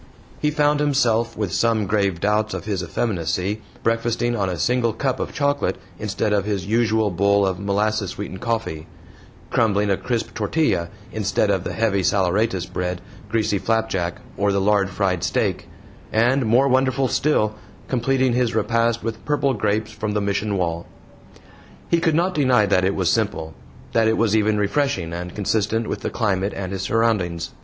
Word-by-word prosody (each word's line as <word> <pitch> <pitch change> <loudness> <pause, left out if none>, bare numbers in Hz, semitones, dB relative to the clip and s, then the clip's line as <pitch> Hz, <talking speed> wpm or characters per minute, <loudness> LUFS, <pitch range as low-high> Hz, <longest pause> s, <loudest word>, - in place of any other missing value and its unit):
He 150 - +1
found 150 0 +2
himself, 120 -6 +1
with 100 -4 -2
some 110 +1 +2
grave 100 -3 0
doubts 105 +2 +1
of - - -6
his 100 -4 -2
effeminacy, 95 +1 -2 0.2
breakfasting 115 +1 0
on 100 -4 0
a 90 - -3
single 120 +5 +1
cup 130 +3 -1
of - - -3
chocolate 145 -2 0 0.2
instead 105 0 -1
of 100 -2 +2
his 100 -2 -2
usual 110 -1 +2
bowl 100 +2 +3
of 95 -1 -1
molasses 100 0 0
sweetened 95 -1 -6
coffee; 110 -9 -2 0.6
crumbling 105 -3 +2
a 95 - +2
crisp 120 -3 -3
tortilla 105 - 0 0.2
instead 105 -1 +1
of 95 -3 0
the - - -4
heavy 110 -3 +1
saleratus 95 0 +1
bread, 90 0 -3 0.3
greasy 105 -2 +1
flapjack, 105 -7 -1 0.2
or 100 0 +2
the 100 - +1
lard 100 -1 +2
fried 90 -2 -1
steak, - - -1 0.4
and, 120 +3 +2
more 125 +5 +4
wonderful 130 0 +2
still, 120 -6 +1 0.3
completing 130 0 +1
his 120 -2 +1
repast 115 +1 +1
with 115 -1 -4
purple 145 -2 +1
grapes 105 0 -1
from 110 -1 -3
the 105 - +1
Mission 100 0 -1
wall. 85 -2 -2 1.0
He 170 - +4
could 165 -2 +1
not 180 +3 +2
deny 130 -8 +3
that 95 -2 +2
it 95 - +1
was 90 -3 +1
simple 80 -8 -1 0.4
that 115 -1 +3
it 110 - +2
was 110 -2 +2
even 110 -1 +2
refreshing 100 - 0
and 90 +1 -6
consistent 110 +2 0
with - - -3
the - - -3
climate 100 -3 0
and 95 -1 -4
his 95 -1 -3
surroundings. 95 -6 0
105 Hz, 170 wpm, -22 LUFS, 95-115 Hz, 1.0 s, more